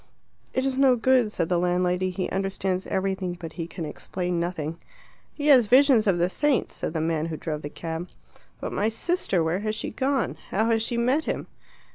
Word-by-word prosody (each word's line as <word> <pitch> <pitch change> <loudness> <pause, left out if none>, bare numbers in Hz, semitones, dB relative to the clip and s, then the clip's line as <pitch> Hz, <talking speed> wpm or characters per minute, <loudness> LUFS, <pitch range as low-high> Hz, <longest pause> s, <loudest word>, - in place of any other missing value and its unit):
"It 260 - 0
is 265 -1 -1
no 265 -2 +5
good," 245 -2 +3
said 165 - -1
the 175 0 +1
landlady. 180 +1 +1
"He 185 0 -2
understands 190 -1 -1
everything 190 -2 -1
but 165 -2 -7
he 165 -2 -5
can 170 -1 -6
explain 180 +3 -3
nothing." 170 -2 -3 0.5
"He 290 - -6
has 255 -6 +7
visions 255 -2 +5
of 190 -3 +3
the 175 +1 +2
saints," 285 +8 0
said - - -4
the 160 - 0
man 160 0 0
who 160 -1 -4
drove 150 -2 -4
the 145 - -5
cab. 165 +3 -5 0.5
"But - - -4
my 210 - +1
sister 225 - 0
where 165 +3 0
has 215 +1 -2
she - - -4
gone? 265 +2 0
How 220 +4 +1
has 225 -1 +2
she 235 +1 -1
met 255 +7 +2
him?" - - -2
190 Hz, 200 wpm, -25 LUFS, 170-240 Hz, 0.5 s, has